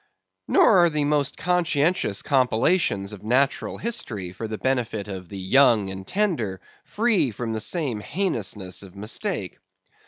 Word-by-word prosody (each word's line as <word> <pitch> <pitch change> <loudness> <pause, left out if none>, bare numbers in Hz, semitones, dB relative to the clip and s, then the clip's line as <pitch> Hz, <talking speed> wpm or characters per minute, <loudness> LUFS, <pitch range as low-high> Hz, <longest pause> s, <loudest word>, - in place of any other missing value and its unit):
Nor 280 - +5
are 175 -1 +5
the 150 -2 -1
most 145 -2 0
conscientious 170 - +1
compilations 125 - +1
of 105 - -10
Natural 130 +5 +1
History 110 - -3
for 110 +5 -6
the 110 0 -5
benefit 120 -6 -1
of 95 -3 -7
the 100 - -7
young 105 0 +3
and 95 0 -8
tender, 155 - -1 0.2
free 215 - +1
from 115 +1 -4
the 110 - -2
same 135 - 0
heinousness 105 - -3
of 100 -1 -13
mistake. 105 +3 -3
120 Hz, 145 wpm, -24 LUFS, 100-165 Hz, 0.2 s, Nor